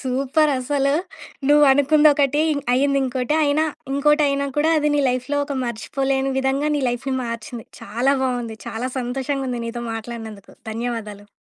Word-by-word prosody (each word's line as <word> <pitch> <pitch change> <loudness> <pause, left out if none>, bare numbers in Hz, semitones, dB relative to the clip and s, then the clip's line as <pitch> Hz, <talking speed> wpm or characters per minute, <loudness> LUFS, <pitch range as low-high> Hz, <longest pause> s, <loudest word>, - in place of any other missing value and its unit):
Super! 275 +4 +1
అసలు 275 +2 0 0.6
నువ్వనుకుందొకటి. 290 0 +4 0.3
అయ్యిందింకోటి. 265 0 +1
అయినా 295 +2 +2 0.3
ఇంకోటయినా 280 -1 +2
కూడా, 310 +2 +3
అది 300 0 +1
నీ 290 - +2
లైఫ్‌లో 255 +3 -2
ఒక 280 -2 -4
మర్చిపోలేని 270 +3 -1
విధంగా 270 +2 0
నీ 285 - -2
లైఫ్‌ని 245 +2 -2
మార్చింది. 230 0 -6
చాలా 240 +7 0
బావుంది. 245 -4 -2
చాలా 240 +3 -3
సంతోషంగుంది 260 0 -2
నీతో 235 +1 -5
మాట్లాడినందుకు. 225 -3 -8 0.2
ధన్యవాదాలు. 220 -3 -5
265 Hz, 120 wpm, -21 LUFS, 240-285 Hz, 0.6 s, నువ్వనుకుందొకటి